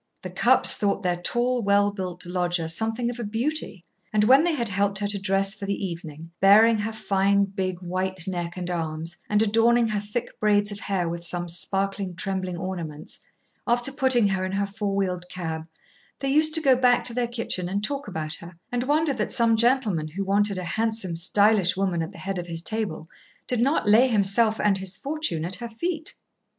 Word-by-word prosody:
The -, -, -6 dB
Cupps -, -, +5 dB
thought 200 Hz, 0 st, -1 dB
their 175 Hz, -1 st, 0 dB
tall, 245 Hz, +5 st, 0 dB
well 200 Hz, 0 st, +3 dB
built 185 Hz, -3 st, -5 dB
lodger 175 Hz, -1 st, -1 dB
something 225 Hz, +7 st, -1 dB
of 245 Hz, -, -9 dB
a -, -, -3 dB
beauty, 225 Hz, -, -3 dB, 0.3 s
and 210 Hz, -1 st, +2 dB
when 265 Hz, +7 st, +6 dB
they 345 Hz, -1 st, +1 dB
had 235 Hz, -5 st, -1 dB
helped 200 Hz, 0 st, 0 dB
her 205 Hz, +1 st, -1 dB
to 205 Hz, 0 st, -1 dB
dress 195 Hz, 0 st, +1 dB
for 200 Hz, -2 st, -6 dB
the 200 Hz, -, 0 dB
evening, 165 Hz, -2 st, -8 dB
baring 215 Hz, +3 st, +6 dB
her 215 Hz, +2 st, -2 dB
fine, 200 Hz, -2 st, +1 dB
big 190 Hz, -2 st, -4 dB
white 185 Hz, 0 st, -3 dB
neck 175 Hz, -2 st, -4 dB
and 180 Hz, -1 st, -4 dB
arms, 165 Hz, 0 st, -4 dB
and 210 Hz, +1 st, +3 dB
adorning 230 Hz, +2 st, +3 dB
her 210 Hz, -1 st, -1 dB
thick 210 Hz, +4 st, -5 dB
braids 205 Hz, -1 st, +2 dB
of 205 Hz, -, -6 dB
hair 190 Hz, -4 st, -1 dB
with 170 Hz, +1 st, -5 dB
some 175 Hz, +1 st, -3 dB
sparkling, 195 Hz, +2 st, -2 dB
trembling 185 Hz, 0 st, -3 dB
ornaments, 170 Hz, -5 st, -6 dB, 0.5 s
after 240 Hz, +3 st, +2 dB
putting 260 Hz, -6 st, +3 dB
her 190 Hz, -1 st, -1 dB
in 185 Hz, 0 st, -3 dB
her 200 Hz, +1 st, 0 dB
four 200 Hz, 0 st, -3 dB
wheeled 180 Hz, -2 st, -2 dB
cab, 160 Hz, -3 st, -5 dB, 0.5 s
they 275 Hz, -, -3 dB
used 310 Hz, +2 st, +4 dB
to 320 Hz, -, +3 dB
go 270 Hz, -4 st, +5 dB
back 250 Hz, -1 st, +3 dB
to 240 Hz, -, +1 dB
their 245 Hz, 0 st, 0 dB
kitchen 230 Hz, -7 st, -3 dB
and 200 Hz, +2 st, -2 dB
talk 280 Hz, +3 st, -3 dB
about 160 Hz, -5 st, -4 dB
her, 170 Hz, +2 st, -8 dB, 0.2 s
and 245 Hz, 0 st, -1 dB
wonder 300 Hz, +1 st, +2 dB
that 215 Hz, -5 st, -2 dB
some 230 Hz, -3 st, +3 dB
gentleman 225 Hz, -9 st, +1 dB
who 185 Hz, +6 st, -4 dB
wanted 200 Hz, 0 st, +1 dB
a 185 Hz, -, -4 dB
handsome, 220 Hz, -2 st, -2 dB
stylish 195 Hz, +2 st, +3 dB
woman 185 Hz, -3 st, 0 dB
at 165 Hz, +3 st, -4 dB
the 200 Hz, -, -13 dB
head 195 Hz, -1 st, -4 dB
of 175 Hz, -, -6 dB
his 165 Hz, -1 st, -3 dB
table, 210 Hz, -8 st, -3 dB, 0.4 s
did 245 Hz, -, 0 dB
not 275 Hz, -2 st, +1 dB
lay 225 Hz, +5 st, +6 dB
himself 215 Hz, 0 st, +3 dB
and 200 Hz, -2 st, +2 dB
his 190 Hz, 0 st, -3 dB
fortune 280 Hz, -, -2 dB
at 180 Hz, +1 st, -1 dB
her 235 Hz, +3 st, -6 dB
feet. 320 Hz, +7 st, -4 dB
200 Hz, 205 wpm, -25 LUFS, 180-230 Hz, 0.5 s, when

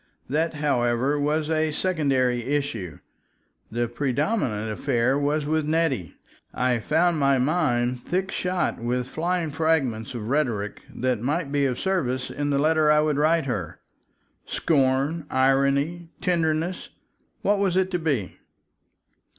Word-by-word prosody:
That, 160 Hz, +4 st, 0 dB
however, 135 Hz, -1 st, +1 dB
was 150 Hz, +1 st, 0 dB
a 155 Hz, -1 st, +1 dB
secondary 135 Hz, -8 st, +1 dB
issue. 125 Hz, -, -2 dB, 0.7 s
The 120 Hz, +1 st, 0 dB
predominant 125 Hz, -, -1 dB
affair 125 Hz, +2 st, +1 dB
was 145 Hz, +1 st, 0 dB
with 155 Hz, 0 st, 0 dB
Nettie. 150 Hz, -, 0 dB, 0.4 s
I 125 Hz, -1 st, +1 dB
found 160 Hz, +6 st, +2 dB
my 140 Hz, -1 st, +3 dB
mind 125 Hz, -4 st, +1 dB
thick 190 Hz, +2 st, -1 dB
shot 180 Hz, -1 st, -1 dB
with 125 Hz, +1 st, -1 dB
flying 170 Hz, +2 st, -1 dB
fragments 135 Hz, -8 st, 0 dB
of 110 Hz, -2 st, -5 dB
rhetoric 120 Hz, -8 st, -1 dB
that 125 Hz, -3 st, -1 dB
might 145 Hz, +4 st, -1 dB
be 140 Hz, -1 st, +2 dB
of 125 Hz, -2 st, -2 dB
service 130 Hz, -10 st, -1 dB
in 145 Hz, 0 st, -2 dB
the 140 Hz, -, +1 dB
letter 155 Hz, +1 st, +3 dB
I 150 Hz, 0 st, +5 dB
would 150 Hz, -2 st, +1 dB
write 160 Hz, +1 st, +3 dB
her. 100 Hz, -, -4 dB, 0.7 s
Scorn, 145 Hz, +1 st, +1 dB
irony, 140 Hz, +5 st, +1 dB
tenderness—what 175 Hz, +4 st, -2 dB
was 190 Hz, -2 st, +1 dB
it 190 Hz, 0 st, +1 dB
to 180 Hz, -, 0 dB
be? 140 Hz, -, -2 dB
145 Hz, 130 wpm, -25 LUFS, 125-160 Hz, 0.7 s, I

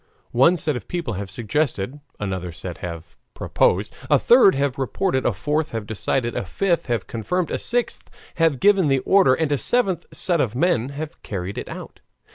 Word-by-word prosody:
One 135 Hz, +9 st, +5 dB
set 150 Hz, -3 st, 0 dB
of 125 Hz, -, -7 dB
people 170 Hz, -10 st, -3 dB
have 100 Hz, 0 st, -5 dB
suggested, 120 Hz, -, -2 dB, 0.2 s
another 95 Hz, -3 st, -3 dB
set 85 Hz, +2 st, -7 dB
have 85 Hz, -2 st, -7 dB, 0.2 s
proposed, 100 Hz, +4 st, +1 dB, 0.2 s
a 145 Hz, -, +6 dB
third 235 Hz, -, +6 dB
have 140 Hz, -1 st, -1 dB
reported, 135 Hz, 0 st, 0 dB
a -, -, +3 dB
fourth 150 Hz, -, -2 dB
have 115 Hz, -2 st, -3 dB
decided, 120 Hz, +3 st, -2 dB
a -, -, -1 dB
fifth 170 Hz, -, -1 dB
have 120 Hz, -5 st, -1 dB
confirmed, 165 Hz, -, -2 dB
a -, -, -1 dB
sixth 240 Hz, 0 st, -1 dB, 0.3 s
have 165 Hz, -5 st, +2 dB
given 195 Hz, -4 st, +4 dB
the 135 Hz, -1 st, +3 dB
order, 190 Hz, -9 st, +5 dB
and 160 Hz, -2 st, -1 dB
a 145 Hz, -, +1 dB
seventh 195 Hz, -, +1 dB
set 175 Hz, -4 st, +1 dB
of 120 Hz, -2 st, -1 dB
men 135 Hz, -4 st, +1 dB
have 150 Hz, +2 st, -7 dB
carried 95 Hz, -2 st, -5 dB
it -, -, -7 dB
out. -, -, -9 dB
135 Hz, 185 wpm, -22 LUFS, 105-170 Hz, 0.3 s, a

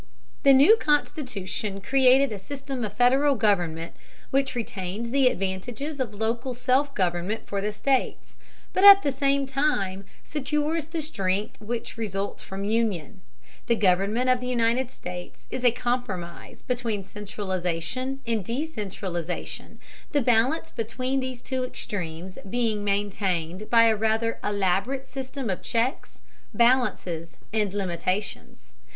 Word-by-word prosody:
The 275 Hz, -, +7 dB
new 285 Hz, +12 st, +7 dB
Constitution 250 Hz, -, -1 dB
created 265 Hz, +4 st, +4 dB
a 205 Hz, -, -4 dB
system 270 Hz, +2 st, -5 dB
of 210 Hz, -2 st, -3 dB
Federal 265 Hz, +5 st, +4 dB
government 175 Hz, -7 st, +1 dB, 0.4 s
which 270 Hz, -1 st, +1 dB
retains 215 Hz, 0 st, -4 dB
the 270 Hz, -1 st, +4 dB
advantages 245 Hz, -, -2 dB
of 250 Hz, -5 st, -1 dB
local 230 Hz, +4 st, -2 dB
self 270 Hz, +3 st, +1 dB
government 180 Hz, +3 st, -1 dB
for 200 Hz, -1 st, -3 dB
the 210 Hz, +1 st, -1 dB
states, 265 Hz, +5 st, -1 dB, 0.4 s
but 375 Hz, -, +1 dB
at 400 Hz, 0 st, +11 dB
the 280 Hz, -, +1 dB
same 275 Hz, +1 st, +1 dB
time 230 Hz, -9 st, 0 dB, 0.2 s
secures 300 Hz, +2 st, -1 dB
the 325 Hz, -1 st, -3 dB
strength 200 Hz, -6 st, -2 dB
which 230 Hz, +2 st, -5 dB
results 200 Hz, -3 st, -3 dB
from 195 Hz, 0 st, -6 dB
union. 210 Hz, -7 st, -1 dB, 0.5 s
The 235 Hz, -, +4 dB
government 205 Hz, +5 st, +2 dB
of 255 Hz, -, +2 dB
the 250 Hz, -, -5 dB
United 240 Hz, +1 st, +1 dB
States 180 Hz, -6 st, -8 dB
is 255 Hz, -, -4 dB
a 245 Hz, -, +7 dB
compromise 225 Hz, -9 st, -4 dB
between 235 Hz, -5 st, -2 dB
centralization 195 Hz, +5 st, -3 dB
and 225 Hz, -3 st, 0 dB
decentralization, 195 Hz, -, -4 dB, 0.3 s
the 290 Hz, -, +3 dB
balance 245 Hz, +6 st, +2 dB
between 255 Hz, +4 st, -2 dB
these 255 Hz, -2 st, -5 dB
two 260 Hz, -1 st, -2 dB
extremes 185 Hz, -7 st, -5 dB
being 225 Hz, -2 st, 0 dB
maintained 200 Hz, -2 st, -1 dB
by 230 Hz, -1 st, +6 dB
a 225 Hz, -1 st, +5 dB
rather 220 Hz, +1 st, 0 dB
elaborate 205 Hz, +7 st, 0 dB
system 265 Hz, 0 st, -5 dB
of 185 Hz, -, -3 dB
checks, 235 Hz, +3 st, -1 dB, 0.4 s
balances, 235 Hz, -9 st, +1 dB, 0.2 s
and 210 Hz, -3 st, +1 dB
limitations. 185 Hz, -, -3 dB
230 Hz, 130 wpm, -26 LUFS, 195-260 Hz, 0.5 s, at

